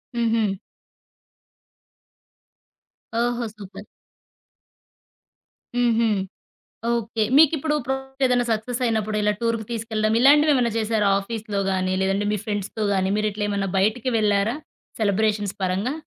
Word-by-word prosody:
హుహు. 225 -4 0 2.6
ఓహో! 240 0 0
సూపర్. 200 -2 -11 1.9
హుహు. 235 -1 +3 0.8
ఓకే. 230 -1 -1
మీకిప్పుడు 310 -1 +4
ప్రాజెక్టేదైనా 265 -2 0
సక్సెస్ 235 +3 -2
అయినప్పుడు 215 -2 -1
ఇలా 210 0 +2
టూర్‌కి 230 -2 -1
తీసుకెళ్ళడం, 220 -1 -1
ఇలాంటివేమన్నా 280 -3 +5
చేసారా 215 -2 +1
ఆఫీస్‌లో 210 0 -4
గాని, 185 0 0
లేదంటే 195 +2 0
మీ 210 - 0
ఫ్రెండ్స్‌తో 205 +1 -3
గాని, 190 0 +1
మీరిట్లెమన్నా 205 -2 -1
బయటికి 220 +5 +1
వెళ్లారా? 210 +2 +1 0.5
సెలబ్రేషన్స్ 205 -1 0
పరంగా? 195 +9 -1
220 Hz, 95 wpm, -23 LUFS, 205-240 Hz, 2.6 s, ఇలాంటివేమన్నా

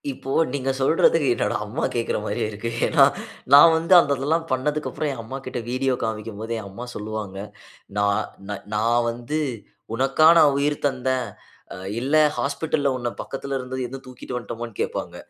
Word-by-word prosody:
இப்போ 135 0 -6 0.2
நீங்க 135 -1 -2
சொல்றதுக்கு 160 +1 +3
என்னோட 105 -3 -1
அம்மா 115 +9 -4
கேக்கற 115 -1 0
மாரியே 115 +1 -2
இருக்கு. 105 +3 -4 0.2
ஏன்னா - - +5 0.5
நான் 160 +4 +9
வந்து 165 +3 +2
அந்த 145 - +2
இதெல்லாம் 160 +4 0
பண்ணதுக்கு 150 +4 -1
அப்புறம் 155 - -2
என் 120 - -6
அம்மாகிட்ட 130 +2 -6
வீடியோ 130 +1 0
காமிக்கும்போது 110 0 -4
என் 100 - -8
அம்மா 115 +6 -8
சொல்லுவாங்க. 105 -2 -5 0.6
நான் 100 +1 +2 0.5
நான் 115 +3 +2
வந்து 120 +6 -3 0.6
உனக்கா 135 +5 +4
நா - - +8
உயிர் 145 +1 +1
தந்தேன். 130 -2 -1 0.7
இல்ல 135 +5 0 0.2
ஹாஸ்பிட்டல்ல 145 0 0
உன்ன 120 -1 -2
பக்கத்தில 135 0 -5
இருந்தது 130 0 -5
தூக்கிட்டு 125 0 -8
வந்துட்டோமான்னு 115 -1 -6
கேட்பாங்க. - - -3
130 Hz, 145 wpm, -23 LUFS, 115-140 Hz, 0.7 s, நான்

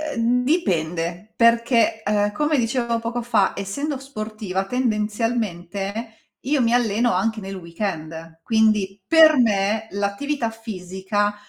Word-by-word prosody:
uhm, 240 +2 +2
dipende, 175 - -1
perché, 230 -1 +3
uhm, 205 0 +1
come 295 +3 +1
dicevo 235 0 0
poco 230 +1 -3
fa, 220 -5 +2
essendo 280 +9 -3
sportiva, 215 -7 -5
tendenzialmente, 215 -3 -2
io 280 0 +1
mi 230 0 +2
alleno 235 0 +2
anche 220 +5 0
nel 195 0 -6
weekend, 165 -3 -6
quindi 215 -3 +2
per 320 -1 +7
me, 215 -1 +1
l'attività 225 +6 -2
fisica 205 -1 -3
220 Hz, 115 wpm, -22 LUFS, 195-235 Hz, -, per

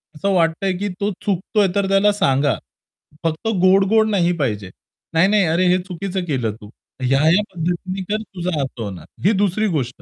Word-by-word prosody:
असं 200 +6 -1
वाटतं 165 +1 +1
आहे, 190 - +1
की 205 +2 -2
तो 205 +1 0
चुकतोय 200 +1 +1
तर 200 -1 +1
त्याला 195 +1 +4
सांगा. 140 -7 +2 0.7
फक्त 165 +5 -2
गोड-गोड 195 +4 +4
नाही 175 -4 +2
पाहिजे. 105 -9 -2 0.4
नाही, 165 +4 +4
नाही, 205 -1 +3
"अरे, 170 +3 +2
हे 180 +1 +4
चुकीचं 190 0 -4
केलं 125 -9 -2
तू. 105 - -11 0.3
ह्या, 135 +2 +3
ह्या 165 +6 +5
पद्धतीने 180 +3 -3
कर, 215 +1 0
तुझं 180 -7 -3
असं 130 -3 -7
होणार." 95 -4 -7 0.2
ही 205 - +6
2री 215 +3 +1
गोष्ट. 125 -2 -4
180 Hz, 180 wpm, -20 LUFS, 150-195 Hz, 0.7 s, ही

